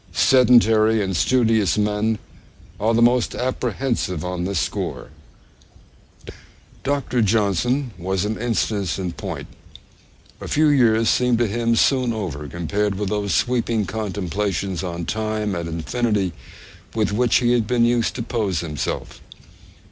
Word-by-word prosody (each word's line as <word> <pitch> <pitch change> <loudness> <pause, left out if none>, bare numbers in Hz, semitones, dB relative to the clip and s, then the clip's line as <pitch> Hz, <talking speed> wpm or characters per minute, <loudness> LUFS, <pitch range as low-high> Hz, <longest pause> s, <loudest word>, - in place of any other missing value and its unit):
Sedentary 115 -2 +4
and 95 -1 -2
studious 110 -4 +2
men 105 +1 0 0.6
are 110 +2 +1
the 115 - +4
most 120 0 +2
apprehensive 125 - -2
on 90 -1 -3
this 100 0 -2
score. - - -3 1.7
Dr. 135 -3 0
Johnson 110 +5 +1
was 95 +2 -1
an 110 +1 -2
instance 110 -5 -1
in 90 -2 -3
point. - - -6 1.0
A - - -6
few 155 +1 +3
years 115 -5 +3
seemed 125 -1 +3
to 120 - +2
him 115 +2 0
soon 125 0 +2
over, 80 -9 -5
compared 100 +6 -2
with 100 0 -3
those 105 -2 -1
sweeping 115 -3 0
contemplations 100 -2 -3
on 85 -2 -4
time 110 0 -2
and 85 -2 -3
infinity 100 +3 -1 0.6
with 110 -2 +1
which 120 +2 +2
he 120 -1 +3
had 120 -3 +1
been 120 0 +3
used 120 -1 +1
to 120 - -3
pose 105 -8 -1
himself. 75 -4 -4
110 Hz, 135 wpm, -21 LUFS, 95-120 Hz, 1.7 s, Sedentary